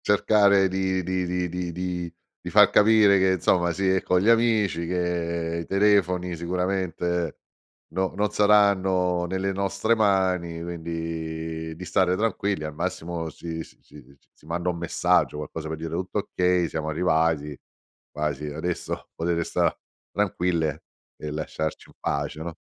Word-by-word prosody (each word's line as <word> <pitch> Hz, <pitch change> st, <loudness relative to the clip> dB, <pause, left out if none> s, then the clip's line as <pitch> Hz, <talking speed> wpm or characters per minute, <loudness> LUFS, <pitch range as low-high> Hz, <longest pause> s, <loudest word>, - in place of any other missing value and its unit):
Cercare 100 Hz, -1 st, +4 dB
di 95 Hz, 0 st, -1 dB
di 90 Hz, 0 st, -1 dB
di 90 Hz, 0 st, -2 dB
di 90 Hz, 0 st, -4 dB, 0.3 s
di -, -, -5 dB
fa -, -, +6 dB
capire 105 Hz, -2 st, +6 dB
che 95 Hz, -, +3 dB
insomma 85 Hz, -1 st, +2 dB
si 95 Hz, +3 st, -1 dB
è 95 Hz, 0 st, +3 dB
con 90 Hz, -, +2 dB
gli 100 Hz, +5 st, +2 dB
amici, 110 Hz, -7 st, +2 dB
che 85 Hz, -1 st, -1 dB
i -, -, -7 dB
telefoni 95 Hz, -3 st, +2 dB
sicuramente 90 Hz, -1 st, -2 dB, 0.5 s
no 95 Hz, +3 st, -1 dB
non 105 Hz, +1 st, 0 dB
saranno 95 Hz, -4 st, +3 dB
nelle 95 Hz, +2 st, -1 dB
nostre 100 Hz, +3 st, 0 dB
mani, 95 Hz, -5 st, +1 dB
quindi 80 Hz, -1 st, -5 dB
di 90 Hz, -, -8 dB
stare 90 Hz, +1 st, +2 dB
tranquilli. 100 Hz, -5 st, -1 dB
Al 75 Hz, -1 st, -5 dB
massimo 85 Hz, +2 st, -3 dB
si 80 Hz, +1 st, -6 dB
si -, -, -18 dB, 0.6 s
si -, -, -24 dB
manda 85 Hz, +2 st, -1 dB
un 85 Hz, -, -2 dB
messaggio, 85 Hz, -2 st, +1 dB
qualcosa 75 Hz, +1 st, -6 dB
per 80 Hz, 0 st, -4 dB
dire: 80 Hz, 0 st, -6 dB
"Tutto 90 Hz, +3 st, -3 dB, 0.2 s
okay, 90 Hz, -1 st, +2 dB
siamo 80 Hz, 0 st, -3 dB
arrivati. 80 Hz, -2 st, +1 dB, 0.5 s
Quasi 75 Hz, -1 st, -3 dB
adesso 80 Hz, +4 st, -4 dB
potete 85 Hz, 0 st, -1 dB
sta -, -, +1 dB, 0.4 s
tranquille 90 Hz, -6 st, -1 dB, 0.3 s
e 75 Hz, -, -6 dB
lasciarci 80 Hz, +1 st, -4 dB
in -, -, -20 dB
pace, 75 Hz, +2 st, -2 dB
no?" 85 Hz, 0 st, -6 dB
90 Hz, 145 wpm, -25 LUFS, 80-95 Hz, 0.6 s, fa